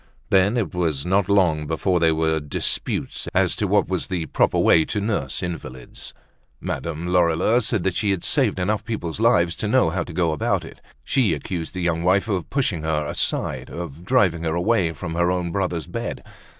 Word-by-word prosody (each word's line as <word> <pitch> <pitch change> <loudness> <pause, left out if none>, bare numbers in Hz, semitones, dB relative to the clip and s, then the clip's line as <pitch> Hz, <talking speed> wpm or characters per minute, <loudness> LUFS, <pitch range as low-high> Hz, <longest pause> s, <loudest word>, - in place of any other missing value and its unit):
Then 100 +4 +4
it 110 -5 -1
was 80 -6 -1
not 95 +1 +1
long 85 -7 +2
before 90 +3 0
there 80 -1 +3
were 80 0 +1
disputes 75 -1 -2
as - - +3
to - - 0 0.4
the 90 -3 -2
proper - - +1
way 80 - +5
to 105 - -2
nurse 105 -2 -2
invalids. 65 -8 -7 0.4
Madame 85 0 -4
Lorilleux 90 +6 +3
said 110 -4 0
that 95 -2 0
she 105 - 0
had 95 -3 0
saved - - +2
enough 105 +3 -1
people's 100 -7 -4
lives 95 -7 +3
to 110 - -2
know 110 -6 +3
how 95 - -1
to - - -10
go 85 -1 +1
about 75 - 0
it. - - -13 0.2
She 130 -6 +2
accused 85 -1 -5
the 90 - -3
young 85 -1 0
wife 95 +4 +2
of 95 -6 -2
pushing 120 - 0
her 80 -1 -1
aside, - - -2
of 85 -2 -7
driving 95 -7 +2
her 80 0 -1
away 90 -1 +1
from 80 0 -6
her 85 +1 +1
own 90 -1 -1
brother's 90 -4 -2
bed. - - -5
90 Hz, 190 wpm, -22 LUFS, 80-100 Hz, 0.4 s, way